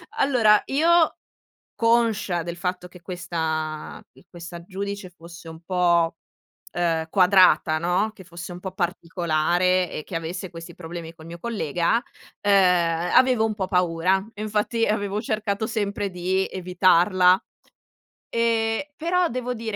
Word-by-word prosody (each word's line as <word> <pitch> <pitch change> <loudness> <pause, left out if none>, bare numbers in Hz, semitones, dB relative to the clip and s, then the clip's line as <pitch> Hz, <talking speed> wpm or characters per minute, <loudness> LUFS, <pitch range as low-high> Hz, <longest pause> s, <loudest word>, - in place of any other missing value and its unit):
allora, 230 -6 +4
io 325 +4 +3 0.6
conscia 230 -6 +1
del 170 +1 -6
fatto 180 0 -4
che 180 0 -15
questa 160 -3 -4
q - - -22
questa 170 -1 -10
giudice 200 0 -5
fosse 170 -1 -13
un 160 0 -10
po', 170 -2 +1 0.6
uhm, 165 -2 0
quadrata, 185 -4 +5
no, 180 +6 0
che 190 - -13
fosse 175 +1 -9
un 175 - -9
po' 190 -1 -6
particolare, 175 0 0
e 155 - -6
che 175 - -6
avesse 175 +3 -5
questi 165 0 -10
problemi 165 -1 -8
col 160 -1 -15
mio 170 +1 -9
collega, 175 -2 0 0.5
uhm, 205 - +2 0.6
avevo 250 -4 +4
un 215 - -2
po' 190 -3 -3
paura, 180 +1 +1
e 210 - -7
infatti 215 +2 0
avevo 205 -1 -1
cercato 215 -1 -2
sempre 205 -2 -2
di 185 +2 -1
evitarla, 185 +1 +3 0.9
e 230 +4 0
però 355 +2 +1
devo 250 -1 -3
di 225 -1 -7
evitarla. 220 - -2
185 Hz, 140 wpm, -24 LUFS, 170-215 Hz, 0.9 s, quadrata